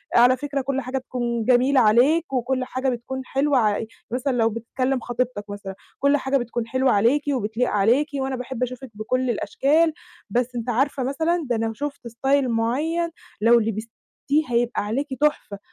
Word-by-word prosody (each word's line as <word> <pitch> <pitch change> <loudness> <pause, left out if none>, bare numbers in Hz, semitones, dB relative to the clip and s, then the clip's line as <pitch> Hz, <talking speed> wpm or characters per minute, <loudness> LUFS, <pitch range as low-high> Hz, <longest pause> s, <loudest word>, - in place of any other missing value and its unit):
"على 245 +2 +6
فكرة 285 -1 -3
كل 270 0 -2
حاجة 255 +1 -3
تكون 240 -3 -3
جميلة 255 +3 +4
عليك 270 +8 +3
وكل 255 +1 0
حاجة 260 +1 -2
بتكون 255 +2 -4
حلوة 275 +1 +1
ع" 215 -2 +2 0.3
مثلًا 255 +3 -1
لو 225 -1 +3
بتكلم 255 +4 -2
خطيبتك 240 -4 -3
مثلًا: 200 -1 -7 0.2
"كل 280 +1 +3
حاجة 270 0 0
بتكون 240 -2 -3
حلوة 260 +2 +2
عليكِ 235 +8 +3
وبتليق 235 0 -1
عليكِ، 230 +9 +3
وأنا 270 -1 -2
باحب 255 0 -4
أشوفِك 255 +1 -5
بكل 250 +5 -1
الأشكال، 295 +9 +2 0.4
بس 245 +3 -1
أنتِ 240 +1 -3
عارفة 265 +3 +1
مثلًا 320 +5 0
ده 240 - +1
لو 225 0 -1
شفتِ 285 0 -5
style 270 +4 +1
معيّن 280 +9 0 0.3
لو 235 +2 +6
لبستِيه 220 +1 -4 0.5
هيبقى 240 -1 0
عليكِ 255 +8 -2
تحفة." 295 -9 0
250 Hz, 165 wpm, -23 LUFS, 230-270 Hz, 0.5 s, على